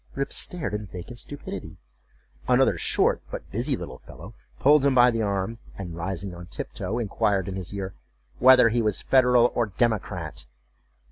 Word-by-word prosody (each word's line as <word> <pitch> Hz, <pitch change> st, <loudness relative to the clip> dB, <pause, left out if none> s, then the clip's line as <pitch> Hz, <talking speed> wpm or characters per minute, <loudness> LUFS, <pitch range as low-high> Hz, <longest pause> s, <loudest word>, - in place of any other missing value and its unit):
Rip 140 Hz, 0 st, -2 dB
stared 175 Hz, -11 st, -3 dB
in 105 Hz, 0 st, -4 dB
vacant 90 Hz, +7 st, -8 dB
stupidity. 145 Hz, -, -8 dB, 0.7 s
Another -, -, +4 dB
short -, -, +1 dB
but -, -, -8 dB
busy -, -, 0 dB
little -, -, -8 dB
fellow 95 Hz, +9 st, -12 dB, 0.3 s
pulled 145 Hz, +1 st, +5 dB
him 140 Hz, -2 st, +3 dB
by 125 Hz, 0 st, +6 dB
the 115 Hz, -1 st, -1 dB
arm, 100 Hz, +2 st, -2 dB, 0.2 s
and, 90 Hz, -4 st, -6 dB
rising 95 Hz, +2 st, -4 dB
on 85 Hz, 0 st, -10 dB
tiptoe, 95 Hz, +4 st, -5 dB
inquired 100 Hz, -4 st, 0 dB
in 95 Hz, -, -4 dB
his 90 Hz, -2 st, -6 dB
ear, 95 Hz, -1 st, -5 dB, 0.5 s
"Whether 130 Hz, -2 st, +7 dB
he 120 Hz, +1 st, +1 dB
was 105 Hz, -3 st, -1 dB
Federal 125 Hz, -2 st, +4 dB
or 120 Hz, -2 st, +1 dB
Democrat?" 110 Hz, -, -2 dB
105 Hz, 160 wpm, -25 LUFS, 95-125 Hz, 0.7 s, Whether